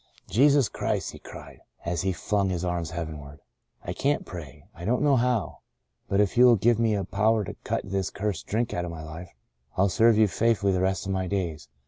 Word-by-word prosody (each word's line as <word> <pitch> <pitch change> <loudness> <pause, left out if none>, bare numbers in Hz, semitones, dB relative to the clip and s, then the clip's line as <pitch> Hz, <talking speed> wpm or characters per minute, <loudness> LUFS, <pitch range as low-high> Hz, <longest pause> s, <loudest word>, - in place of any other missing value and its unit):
" - - -45
Jesus 140 +2 +5
Christ," - - -2
he - - -12
cried, - - -11 0.3
as 85 -1 -1
he 95 0 0
flung 100 +2 0
his 90 -1 -2
arms 85 -2 -2
heavenward, 80 -4 -7 0.4
"I - - -4
can't 145 +2 0
pray 75 -4 -9
— - - -40
I 85 - -11
don't 125 +8 +1
know 145 -2 +4
how. 125 -3 0 0.5
But 100 - +1
if 105 -3 +2
you 125 +1 +7
will 120 -2 +7
give 115 +2 +2
me 115 -2 +2
a 100 - -1
power 110 +3 +1
to - - -6
cut - - -1
this 95 -1 -2
cursed 100 -4 -4
drink 115 +3 -1
out 90 - -2
of 90 - -4
my 80 -1 -7
life, 80 +3 -8 0.5
I'll 100 +2 +3
serve 110 +4 +4
you 110 -1 +5
faithfully 100 -1 +1
the 90 - 0
rest 95 -1 0
of 95 - -2
my 95 -1 -1
days. 85 -7 -3
95 Hz, 225 wpm, -26 LUFS, 85-110 Hz, 0.5 s, you